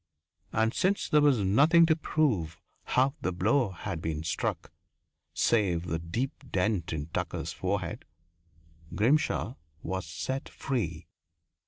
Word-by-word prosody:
And 110 Hz, +1 st, +1 dB
since 195 Hz, +2 st, +1 dB
there 150 Hz, -, +4 dB
was 145 Hz, -3 st, +5 dB
nothing 140 Hz, -, +5 dB
to 160 Hz, -1 st, +3 dB
prove 110 Hz, -, 0 dB, 0.3 s
how 130 Hz, +2 st, +2 dB
the 95 Hz, -, 0 dB
blow 105 Hz, +7 st, +2 dB
had 85 Hz, -2 st, -5 dB
been 80 Hz, -2 st, -3 dB
struck, 80 Hz, -, -2 dB, 0.6 s
save 90 Hz, -7 st, +1 dB
the 80 Hz, -2 st, -2 dB
deep 110 Hz, +11 st, -2 dB, 0.2 s
dent 95 Hz, -2 st, 0 dB
in 75 Hz, -2 st, -3 dB
Tucker's -, -, -3 dB
forehead, -, -, -2 dB, 0.9 s
Grimshaw 130 Hz, +1 st, +1 dB, 0.3 s
was 95 Hz, +1 st, -3 dB
set 135 Hz, +1 st, -4 dB
free. 90 Hz, -, -3 dB
105 Hz, 125 wpm, -29 LUFS, 85-135 Hz, 0.9 s, was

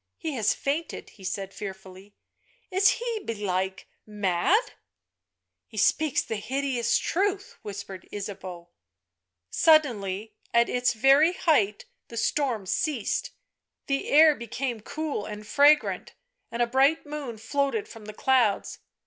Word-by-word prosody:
" -, -, -57 dB
He 320 Hz, -, -4 dB
has 225 Hz, -7 st, +1 dB
fainted," 300 Hz, +4 st, -3 dB
he 195 Hz, -, -17 dB
said 195 Hz, +1 st, -4 dB
fearfully; 190 Hz, 0 st, -9 dB, 0.3 s
" -, -, -38 dB
is 395 Hz, +1 st, +6 dB
he, 470 Hz, -1 st, -3 dB
belike, 190 Hz, -3 st, -3 dB, 0.2 s
mad 205 Hz, -, +2 dB
?" -, -, -18 dB
u -, -, -16 dB, 0.9 s
He 220 Hz, -, -13 dB
speaks 295 Hz, +7 st, +2 dB
the 220 Hz, -, -4 dB
hideous 255 Hz, +1 st, 0 dB
truth," 390 Hz, +2 st, -1 dB
whispered 200 Hz, -2 st, -8 dB
Ysabcau. 190 Hz, -4 st, -7 dB, 0.8 s
Suddenly, 220 Hz, -, +2 dB, 0.2 s
at 235 Hz, 0 st, +4 dB
its 245 Hz, 0 st, +1 dB
very 275 Hz, +8 st, +5 dB
height 220 Hz, -, +1 dB, 0.2 s
the 230 Hz, -, -9 dB
storm 235 Hz, -3 st, 0 dB
ceased, 290 Hz, -, -1 dB, 0.6 s
the 275 Hz, 0 st, -2 dB
air 310 Hz, +1 st, +7 dB
became 240 Hz, -1 st, -4 dB
cool 295 Hz, -3 st, -4 dB
and 210 Hz, 0 st, -7 dB
fragrant, 290 Hz, +5 st, +3 dB, 0.3 s
and 235 Hz, +1 st, 0 dB
a -, -, +3 dB
bright 270 Hz, +7 st, +2 dB
moon 290 Hz, -6 st, -6 dB
floated 280 Hz, -, -1 dB
from 225 Hz, -2 st, -12 dB
the 215 Hz, -, -8 dB
clouds. 245 Hz, -6 st, +1 dB
235 Hz, 135 wpm, -26 LUFS, 205-295 Hz, 0.9 s, air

